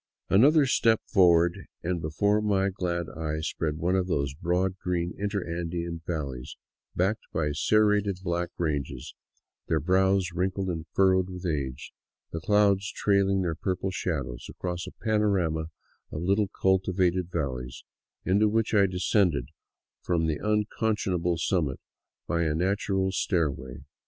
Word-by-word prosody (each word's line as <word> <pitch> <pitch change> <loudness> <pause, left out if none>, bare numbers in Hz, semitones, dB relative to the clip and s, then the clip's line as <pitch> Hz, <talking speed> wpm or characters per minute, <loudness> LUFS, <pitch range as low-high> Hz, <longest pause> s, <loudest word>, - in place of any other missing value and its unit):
Another 140 +9 +6
step 115 -3 +3
forward, 85 -3 +3 0.2
and 85 0 -1
before 100 +7 +1
my 100 -2 +1
glad 85 -2 -2
eyes 80 0 -3
spread 75 -2 -2
one 90 +3 0
of 95 -1 +1
those 70 -6 -1
broad, 90 +4 -1
green 90 -1 -2
interandean 85 -4 -3
valleys, 70 -7 -4 0.4
backed 100 +5 0
by 75 -2 0
serrated 105 +4 +2
black 85 -1 -1
ranges, 70 -6 -3 0.5
their 80 - +1
brows 95 +2 +2
wrinkled 95 +2 -1
and 80 -2 -4
furrowed 95 -1 +3
with 90 0 -7
age, 70 -6 -3 0.4
the 80 - -3
clouds 105 +2 +3
trailing 100 -3 +2
their 85 -2 -1
purple 95 +3 -2
shadows 70 -10 -3
across 90 -1 -4
a - - -7
panorama 100 -8 +1 0.5
of 75 - -4
little 100 +3 +2
cultivated 95 -2 +1
valleys, 65 -6 -4 0.4
into 100 +3 +3
which 115 +1 0
I 100 -2 +5
descended 90 - +1 0.5
from 85 -2 0
the 80 -2 -1
unconscionable 105 -5 0
summit 80 -6 0 0.5
by 85 -1 0
a 80 -2 +1
natural 95 +2 0
stair 85 -5 +1
way. 65 -1 -9
90 Hz, 135 wpm, -27 LUFS, 80-100 Hz, 0.5 s, Another